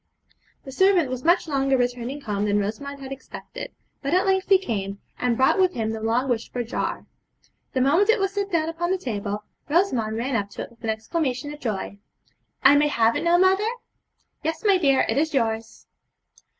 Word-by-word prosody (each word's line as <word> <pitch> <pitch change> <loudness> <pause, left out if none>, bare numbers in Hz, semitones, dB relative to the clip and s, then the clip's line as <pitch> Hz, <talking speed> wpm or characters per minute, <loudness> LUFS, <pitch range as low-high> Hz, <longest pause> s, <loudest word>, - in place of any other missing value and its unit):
The 270 - -9
servant 360 -3 +3
was 255 -1 -4
much 345 +1 +3
longer 270 -2 +1
returning 245 +3 -2
home 210 -5 -2
than 205 0 +2
Rosamond 275 +8 -4
had 265 0 -8
expected; 270 -1 -8 0.3
but 280 +5 0
at 370 +2 +3
length 380 0 +1
he 390 - +8
came, 200 - -4 0.2
and 245 -2 +1
brought 265 +8 +3
with 370 -1 +3
him 220 -2 -1
the 220 0 -5
long 230 +4 +1
wished 235 -3 -2
for 245 - -2
jar. 235 - -3 0.7
The 260 - +1
moment 320 - +3
it 450 - +5
was 390 0 0
set 400 -1 -2
down 325 -2 +1
upon 335 +1 -2
the 380 - +1
table, 210 - -4 0.3
Rosamond 255 - +1
ran 250 +3 -1
up 205 -2 -1
to - - -5
it - - -11
with 235 0 -23
an 225 - -2
exclamation 260 +5 -2
of 295 - -11
joy. 205 -5 -4 0.6
'I 280 +2 +7
may 295 +1 +4
have 230 -5 +2
it - - -1
now, 340 0 +4
mother?' 375 +2 +4 0.8
'Yes, 320 +1 -2
my 395 -3 +5
dear! 275 -5 +3
it - - +1
is 315 -1 0
yours.' 225 -2 -2
270 Hz, 200 wpm, -24 LUFS, 225-340 Hz, 0.8 s, he